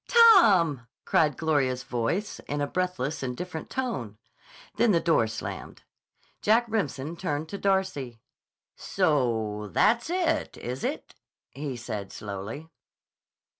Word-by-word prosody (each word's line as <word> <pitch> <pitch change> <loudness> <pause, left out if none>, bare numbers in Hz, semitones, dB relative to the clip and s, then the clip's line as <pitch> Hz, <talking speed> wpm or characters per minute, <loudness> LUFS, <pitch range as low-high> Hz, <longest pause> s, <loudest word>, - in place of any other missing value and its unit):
"Tom!" 200 - +6 0.2
cried 150 -4 +2
Gloria's 135 -5 +1
voice 125 - -2
in 145 - -2
a 145 - +1
breathless 160 -4 -2
and 125 -2 -3
different 180 -3 -6
tone. 130 - -3 0.6
Then 230 -3 +4
the 170 - +4
door 165 -10 +2
slammed. 110 +1 -7 0.6
Jack 225 +3 +4
Remsen 170 - -2
turned 155 -3 -3
to 200 - -5
Darcy. 190 -12 0 0.6
"So 115 - 0
that's 235 +6 +3
it, 335 -3 0
is 125 +2 -5
it?" - - -3 0.4
he 135 -2 -5
said 110 -5 -5
slowly. 105 +9 -6
150 Hz, 120 wpm, -27 LUFS, 125-195 Hz, 0.6 s, Tom